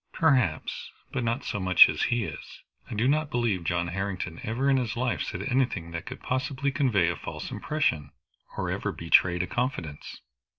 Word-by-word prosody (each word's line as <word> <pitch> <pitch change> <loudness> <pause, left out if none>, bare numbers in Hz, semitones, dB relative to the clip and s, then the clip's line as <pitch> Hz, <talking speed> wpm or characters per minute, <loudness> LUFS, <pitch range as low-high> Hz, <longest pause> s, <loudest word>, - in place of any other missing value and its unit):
"Perhaps, 125 - +1 0.2
but 130 - -2
not 115 +4 -1
so 105 - -2
much 95 -1 +8
as - - -3
he 120 -1 +1
is. 80 -7 -8 0.3
I - - -5
do 115 +4 +2
not 150 +2 +2
believe 115 - 0
John 85 0 0
Harrington 90 -2 -4
ever 120 +5 -1
in 135 -1 +4
his 120 -3 -2
life 125 0 0
said - - -4
anything 125 -10 0
that 85 0 -6
could - - -7
possibly 135 +2 -1
convey 120 - +2
a 85 - -1
false - - -7
impression, 80 - -1 0.5
or - - -1
ever - - -2
betrayed 85 +1 +3
a - - -1
confidence." 90 - -4
115 Hz, 180 wpm, -27 LUFS, 85-130 Hz, 0.5 s, much